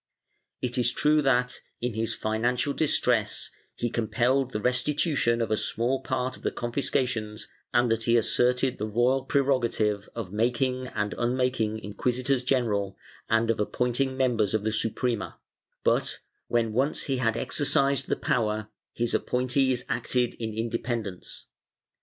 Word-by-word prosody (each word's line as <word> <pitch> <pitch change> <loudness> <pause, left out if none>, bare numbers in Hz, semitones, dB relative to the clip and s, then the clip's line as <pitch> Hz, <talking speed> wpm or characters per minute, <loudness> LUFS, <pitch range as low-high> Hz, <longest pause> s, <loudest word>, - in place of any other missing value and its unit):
It 125 0 -1
is 120 0 +3
true 150 0 +3
that, 125 -3 +1 0.2
in 120 -1 -2
his 110 +1 -1
financial 120 +5 0
distress, 125 -8 +1 0.2
he 120 -1 -2
compelled 120 +4 +1
the 105 - -3
restitution 125 0 +1
of 110 - -4
a 110 - +2
small 120 +6 0
part 130 0 -2
of - - -15
the - - 0
confiscations 120 -3 -2 0.2
and 120 -1 +3
that 115 0 0
he 120 0 +4
asserted 125 +3 +2
the 105 - -2
royal 125 +5 +2
prerogative 120 -7 +1
of 105 -5 -5
making 125 +3 0
and 105 -4 -2
unmaking 120 -3 0
inquisitors 125 +5 -1
general 110 -7 0 0.3
and 110 +1 +3
of 115 - -3
appointing 125 +5 0
members 115 -6 +2
of 105 - 0
the 110 - 0
Suprema 115 +1 -1 0.5
but, - - +1 0.3
when 115 -2 +1
once 135 +6 +1
he 135 -2 -1
had 115 -2 +1
exercised 140 0 +2
the - - +1
power, 110 -2 -1 0.2
his 120 0 -1
appointees 130 0 +1
acted 125 -2 0
in 110 -1 -3
independence. 115 -3 -4
120 Hz, 140 wpm, -27 LUFS, 110-130 Hz, 0.5 s, he